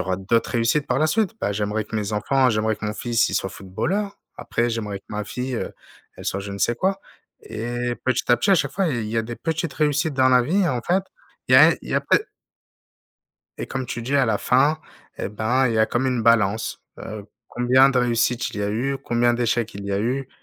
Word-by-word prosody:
aura 95 0 -1
d'autres 105 +5 0
réussites 120 +5 +1
par 125 +1 +1
la 155 - +3
suite, 215 +5 0
bah, 100 - 0
j'aimerais 105 +1 -2
que 110 - -10
mes 105 -1 -2
enfants 130 +5 +2
j'aimerais 110 0 +1
que 105 - -9
mon 105 0 -2
fils, 115 0 +1
il - - -4
soit 95 - 0
footballeur, 190 - -3 0.2
après 120 0 -1
j'aimerais 105 -3 -3
que - - -29
ma 105 0 -3
fille, 125 +4 -4
heu, - - -4 0.4
elle - - -10
soit 100 - -2
je 100 0 -7
ne 100 - -6
sais 120 +4 +1
quoi 195 +8 -1 0.4
et 120 +2 -3
petit 130 -1 0
à 120 - +6
petit 200 - 0
à 195 - +7
chaque - - 0
fois 195 -1 0
il 120 -7 -2
y 115 - -3
a 115 - +2
des 120 +2 -6
petites 160 -1 -2
réussites 150 0 +1
dans 130 -1 +3
la 125 -1 +5
vie 170 +11 0
et 175 - +2
en 125 -3 -2
fait, 185 +7 +1 0.5
il - - +1
y - - +10
a - - +9
un - - +4
il - - -12
y - - 0
a - - +3
pas - - +4
de 420 - -10 1.3
Et - - -4
comme 130 -2 -4
tu 120 - -5
dis 135 +4 0
à 135 -2 +3
la 110 -2 +1
fin, 145 +5 +2 0.4
et - - -3
ben, 120 +5 +1
il 115 - -1
y - - +1
a 110 - +4
comme 130 +2 -1
une 125 -3 0
balance, 115 -1 +2 0.2
heu, 105 -2 -7 0.2
combien 125 +2 +4
de 130 -2 +1
réussites 120 -1 +1
il - - -7
y 105 - -1
a 100 - -1
eu, 135 +6 -1
combien 120 0 +1
d'échecs 120 -2 -1
il 100 - -7
y 100 - -3
a 100 - 0
eu? 130 +4 -2
120 Hz, 255 wpm, -23 LUFS, 110-135 Hz, 1.3 s, y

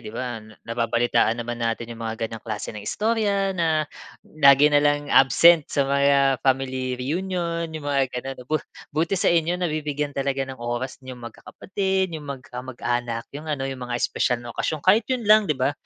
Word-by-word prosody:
'Di 105 - -6
ba, 120 -1 -4 0.3
nababalitaan 115 0 +1
naman 120 0 -5
natin 115 0 -2
'yong 115 0 -9
mga 110 0 -3
ganyang 110 0 -9
klase 110 -2 -4
ng 105 - -7
istorya 205 - 0
na 160 -2 +1 0.6
lagi 140 +1 +7
na - - +6
lang 145 0 +1
absent 160 +4 +6
sa 140 - +1
mga 140 -1 +3
family 130 -1 0
reunion, 170 +3 -2
'yong 155 -2 -7
mga 140 -1 +2 0.2
gano'n. 135 +1 -7
Bu 155 0 +1 0.3
buti 165 +5 0
sa - - +2
inyo 170 +1 +1
nabibigyan 150 -4 -2
talaga 135 0 -1
ng 130 -2 -9
oras 120 +3 -4
niyong 130 -1 -8
magkakapatid, 190 - -2
'yong 150 -2 -7
mag 130 - -18 0.2
mag-anak, 120 -2 -3
'yong 150 +2 -8
ano 140 -3 -2
'yong 135 -1 -5
mga 120 - -1
espesyal 125 - +1
na 120 - -7
okasyon 155 -2 -2
kahit 210 +4 +5
yun 255 -3 -1
lang 215 -2 +5
'di 150 - +1
ba? 135 +3 +1
140 Hz, 180 wpm, -24 LUFS, 125-165 Hz, 0.6 s, lagi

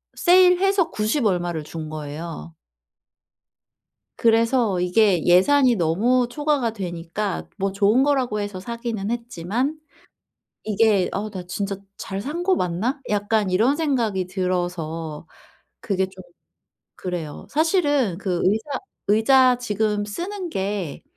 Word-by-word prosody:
세일해서 365 0 +4
90 220 +4 0
얼마를 175 -5 0
준 155 -1 -7
거예요. 155 +2 -7 1.6
그래서 230 -3 +2
이게 180 -1 +3
예산이 245 +8 +5
너무 220 +9 +2
초과가 290 -5 0
되니까 180 0 -4
뭐 195 0 -1
좋은 210 +6 +3
거라고 260 -7 +1
해서 205 -2 -4
사기는 230 -1 -4
했지만 240 - -2 0.9
이게 210 -2 +2
'어. 210 +2 -3
나 185 -3 -6
진짜 195 +2 -3 0.2
잘 195 0 -5
산 305 +9 -4
거 375 +1 +3
맞나?' 215 - -1
약간 205 -1 +1
이런 230 +10 +3
생각이 235 - 0
들어서 175 -4 -3 0.5
그게 190 -2 0
좀 190 0 -13 0.7
그래요. 175 -5 -5
사실은 290 - +1
그 185 -3 -2
의사 220 +8 0 0.3
의자 250 +4 +5
지금 210 -3 -1
쓰는 355 - -5
게 195 - -3
210 Hz, 230 characters per minute, -23 LUFS, 180-255 Hz, 1.6 s, 예산이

